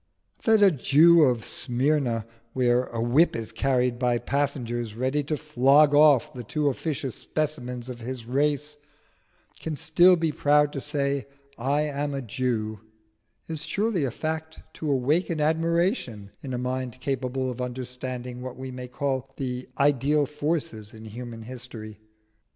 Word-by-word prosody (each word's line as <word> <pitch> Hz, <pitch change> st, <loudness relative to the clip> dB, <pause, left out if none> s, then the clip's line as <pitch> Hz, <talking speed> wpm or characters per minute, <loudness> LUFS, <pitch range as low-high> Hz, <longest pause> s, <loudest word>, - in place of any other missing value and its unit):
That 220 Hz, -2 st, +5 dB
a 195 Hz, -, +7 dB
Jew 160 Hz, +4 st, +5 dB
of 120 Hz, -4 st, 0 dB
Smyrna, 125 Hz, -3 st, 0 dB, 0.3 s
where 125 Hz, -1 st, +2 dB
a 115 Hz, -, -6 dB
whip 125 Hz, +9 st, +3 dB
is 115 Hz, -1 st, -4 dB
carried 125 Hz, 0 st, +1 dB
by 125 Hz, -1 st, +2 dB
passengers 120 Hz, -5 st, -2 dB
ready 130 Hz, +5 st, 0 dB
to 155 Hz, +1 st, -1 dB
flog 145 Hz, 0 st, +4 dB
off 145 Hz, -2 st, +5 dB
the 125 Hz, -2 st, -7 dB
too 145 Hz, +6 st, 0 dB
officious 140 Hz, -2 st, -3 dB
specimens 125 Hz, -6 st, -3 dB
of 125 Hz, -2 st, -7 dB
his 125 Hz, 0 st, -6 dB
race, 150 Hz, +3 st, 0 dB, 0.8 s
can 160 Hz, -2 st, -4 dB
still 175 Hz, +4 st, +5 dB
be 165 Hz, -2 st, 0 dB
proud 150 Hz, 0 st, +3 dB
to 140 Hz, -, -4 dB
say, 140 Hz, -2 st, -1 dB, 0.3 s
"I 140 Hz, +5 st, 0 dB
am 145 Hz, -1 st, -2 dB
a 135 Hz, -, -2 dB
Jew," 110 Hz, -2 st, -2 dB, 0.7 s
is 160 Hz, -2 st, -3 dB
surely 200 Hz, +1 st, 0 dB
a 135 Hz, -, +1 dB
fact 160 Hz, +4 st, -4 dB, 0.2 s
to 155 Hz, -, -3 dB
awaken 155 Hz, +6 st, +1 dB
admiration 160 Hz, -, 0 dB
in 130 Hz, -2 st, -4 dB
a -, -, -2 dB
mind 125 Hz, 0 st, -3 dB
capable 130 Hz, -1 st, -2 dB
of 125 Hz, 0 st, -6 dB
understanding 125 Hz, 0 st, -5 dB
what 130 Hz, 0 st, -7 dB
we 130 Hz, 0 st, -6 dB
may 125 Hz, 0 st, -7 dB
call 135 Hz, 0 st, -2 dB
the 125 Hz, -2 st, -4 dB
ideal 145 Hz, +1 st, +3 dB
forces 145 Hz, -8 st, -3 dB
in 110 Hz, 0 st, -11 dB
human 115 Hz, +1 st, -8 dB
history. 115 Hz, -3 st, -8 dB
130 Hz, 150 wpm, -26 LUFS, 125-150 Hz, 0.8 s, a